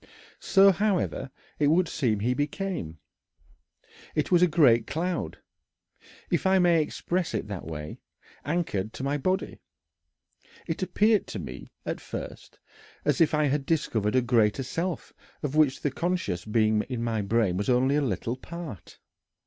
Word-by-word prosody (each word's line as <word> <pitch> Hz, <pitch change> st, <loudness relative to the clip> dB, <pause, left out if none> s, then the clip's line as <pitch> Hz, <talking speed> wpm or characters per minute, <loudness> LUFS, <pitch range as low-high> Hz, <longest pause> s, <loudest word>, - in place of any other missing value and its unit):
So, 195 Hz, 0 st, +6 dB
however, 190 Hz, -8 st, 0 dB, 0.3 s
it 145 Hz, -, +3 dB
would 170 Hz, +4 st, +3 dB
seem 115 Hz, -11 st, 0 dB
he 125 Hz, +4 st, +1 dB
became. 145 Hz, -, -3 dB, 1.2 s
"I 150 Hz, -, +4 dB
was 175 Hz, -1 st, +5 dB
a 180 Hz, -, +6 dB
great 130 Hz, -9 st, +4 dB
cloud 170 Hz, +5 st, -2 dB, 0.9 s
if -, -, +1 dB
I 190 Hz, 0 st, +5 dB
may 175 Hz, -3 st, +4 dB
express 170 Hz, 0 st, -2 dB
it 105 Hz, -, -3 dB
that 100 Hz, -4 st, -5 dB
way 75 Hz, -1 st, -6 dB, 0.4 s
anchored 135 Hz, -, -2 dB
to -, -, -6 dB
my 140 Hz, +2 st, 0 dB
body. 185 Hz, +6 st, -1 dB, 1.1 s
It 165 Hz, +1 st, -3 dB
appeared 205 Hz, +4 st, +2 dB
to -, -, -6 dB
me, -, -, -8 dB, 0.2 s
at -, -, -3 dB
first, -, -, -8 dB, 0.5 s
as -, -, +2 dB
if 155 Hz, -1 st, +4 dB
I 150 Hz, -, +2 dB
had 145 Hz, 0 st, 0 dB
discovered 125 Hz, -8 st, 0 dB
a 130 Hz, -, +4 dB
greater 120 Hz, 0 st, +2 dB
self 170 Hz, +6 st, -3 dB, 0.3 s
of 145 Hz, 0 st, -2 dB
which 150 Hz, -4 st, +3 dB
the 145 Hz, -, 0 dB
conscious 170 Hz, -, -2 dB
being 110 Hz, 0 st, +2 dB
in 120 Hz, -3 st, -3 dB
my 115 Hz, -2 st, 0 dB
brain 105 Hz, -2 st, +1 dB
was 100 Hz, +5 st, -2 dB
only 130 Hz, +3 st, +3 dB
a 150 Hz, -, +2 dB
little 115 Hz, -1 st, -2 dB
part. 160 Hz, -, -9 dB
145 Hz, 155 wpm, -27 LUFS, 115-175 Hz, 1.2 s, So